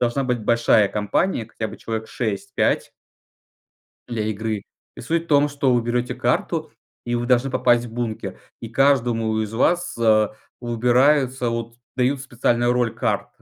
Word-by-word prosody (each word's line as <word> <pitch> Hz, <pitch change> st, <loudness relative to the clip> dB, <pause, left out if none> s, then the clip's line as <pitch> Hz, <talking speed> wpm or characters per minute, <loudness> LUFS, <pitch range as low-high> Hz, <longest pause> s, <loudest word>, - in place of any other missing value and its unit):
должна 125 Hz, +3 st, 0 dB
быть 125 Hz, -2 st, -1 dB
большая 115 Hz, -3 st, +3 dB
компания, 110 Hz, -, -1 dB
хотя 110 Hz, -1 st, -5 dB
бы 110 Hz, -, -9 dB
человек 110 Hz, -1 st, -5 dB
6-5 120 Hz, +3 st, -1 dB, 1.2 s
для 115 Hz, -3 st, -2 dB
игры. 110 Hz, -1 st, -3 dB, 0.3 s
И -, -, -8 dB
суть 165 Hz, +6 st, -1 dB
в -, -, -20 dB
том, 145 Hz, -1 st, +4 dB
что 140 Hz, -3 st, +1 dB
вы 120 Hz, -, +2 dB
берете 120 Hz, +1 st, -1 dB
карту -, -, -1 dB, 0.3 s
и 120 Hz, -, -1 dB
вы 120 Hz, 0 st, -1 dB
должны 125 Hz, +1 st, +2 dB
попасть 120 Hz, -1 st, +2 dB
в 110 Hz, -, -11 dB
бункер. 115 Hz, -2 st, -4 dB, 0.2 s
И 115 Hz, -, -6 dB
каждому 120 Hz, -4 st, +2 dB
из 110 Hz, -1 st, -3 dB
вас 175 Hz, +9 st, +1 dB, 0.6 s
выбираются 125 Hz, +2 st, +2 dB
вот, 115 Hz, 0 st, -4 dB, 0.2 s
дают 130 Hz, +2 st, +1 dB
специальную 120 Hz, -2 st, +1 dB
роль 120 Hz, -2 st, 0 dB
карт. -, -, -1 dB
120 Hz, 150 wpm, -22 LUFS, 115-130 Hz, 1.2 s, том